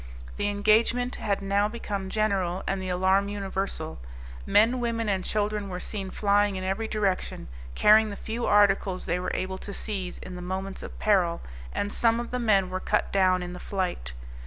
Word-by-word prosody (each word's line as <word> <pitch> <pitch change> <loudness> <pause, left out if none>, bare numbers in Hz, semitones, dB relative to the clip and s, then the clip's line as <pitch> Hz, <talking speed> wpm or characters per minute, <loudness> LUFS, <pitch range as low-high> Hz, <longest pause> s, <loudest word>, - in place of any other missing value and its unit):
The - - 0
engagement 225 +4 +2
had 200 -1 -1
now 200 +1 +2
become 205 -4 -4
general, 195 -4 0
and 195 0 -1
the 185 - -4
alarm 190 +2 +2
universal. 195 - -4 0.5
Men, 230 +5 +4
women 230 -2 -1
and 190 -2 0
children 210 -1 -1
were 180 -1 -4
seen 195 0 -5
flying 205 0 +2
in 185 - -4
every 195 +4 -1
direction, 200 - -1 0.3
carrying 215 +1 +6
the 200 - -5
few 230 +3 -4
articles 195 -2 +3
they 175 +2 0
were 180 - -2
able 190 0 -3
to 200 - -7
seize 190 -4 -4
in 180 - -8
the 180 - -7
moments 190 +2 -4
of - - -8
peril, 180 -5 +2 0.3
and 205 0 -2
some 230 0 +3
of 240 - -5
the 250 - -1
men 200 -6 +2
were 185 - -2
cut - - 0
down 185 -2 +3
in 175 0 -6
the 180 - -8
flight. 180 - -3
200 Hz, 185 wpm, -27 LUFS, 185-215 Hz, 0.5 s, carrying